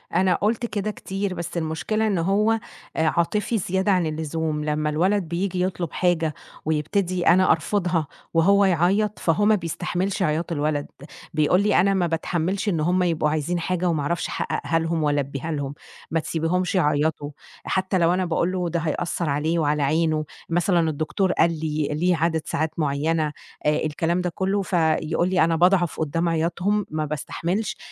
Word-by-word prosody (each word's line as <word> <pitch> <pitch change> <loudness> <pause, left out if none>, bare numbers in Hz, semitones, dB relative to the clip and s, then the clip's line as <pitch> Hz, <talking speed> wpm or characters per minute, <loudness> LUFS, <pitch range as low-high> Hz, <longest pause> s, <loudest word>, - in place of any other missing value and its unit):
أنا 185 -1 +3
قلت 225 +5 0
كده 210 -2 -2
كتير، 195 -1 -4
بس 170 -1 -5
المشكلة 170 +7 -1
إن 200 -3 +1
هو، 200 +6 +2
آآ، 225 - +1 0.5
عاطفي 180 +8 0
زيادة 190 +1 0
عن 180 -3 +2
اللزوم. 155 0 -2
لمّا 150 0 0
الولد 185 +6 +1
بييجي 180 +2 -2
يطلب 180 -3 -2
حاجة 165 -3 +1 0.3
ويبتدي 175 +4 0
أنا 185 +2 +5
أرفضها 170 -1 0 0.3
وهو 200 +5 +4
يعيط، 190 +4 +2
فهو 180 +5 +2
ما 215 +1 +5
بيستحملش 180 +2 -2
عياط 160 +1 -1
الولد. 150 -2 -1 0.5
بيقول 155 +4 +3
لي: 210 - +2
"أنا 195 +1 +3
ما 180 -3 +1
باتحمّلش 175 +4 -1
إن 170 -5 0
هم 180 +4 +2
يبقوا 165 -3 +1
عايزين 155 +3 -1
حاجة 180 +1 0
وما 160 -3 0
أعرفش 170 +4 -1
أحققها 165 - -1
لهم 165 -1 -1
وألبيها 145 +1 -1
لهم، 145 -2 -3 0.4
ما 165 - +2
تسيبيهمش 170 +4 -1
يعيطوا." 150 -3 +1 0.3
حتى 190 0 0
لو 170 -1 +3
أنا 185 0 0
باقول 170 +1 0
له 180 -2 -1
"ده 170 +1 -1
هيأثر 165 +1 -2
عليه 155 +4 0
وعلى 150 -1 +1
عينه." 155 +1 +1 0.2
مثلًا 170 -1 +2
الدكتور 160 +5 0
قال 170 - +3
لي 155 -2 -1
ليه 175 +4 +2
عدد 160 0 +1
ساعات 155 +2 -2
معينة، 155 +1 0 0.3
آآ، 150 - +4
الكلام 165 +3 0
ده 180 - -1
كلّه، 195 +1 0
فيقول 170 -1 +1
لي: 185 -1 +3
"أنا 165 0 +2
باضعف 175 0 +3
قدّام 165 +2 0
عياطهم، 175 +5 0
ما 155 0 -2
باستحملش. 170 +7 -3
170 Hz, 165 wpm, -23 LUFS, 155-185 Hz, 0.5 s, أنا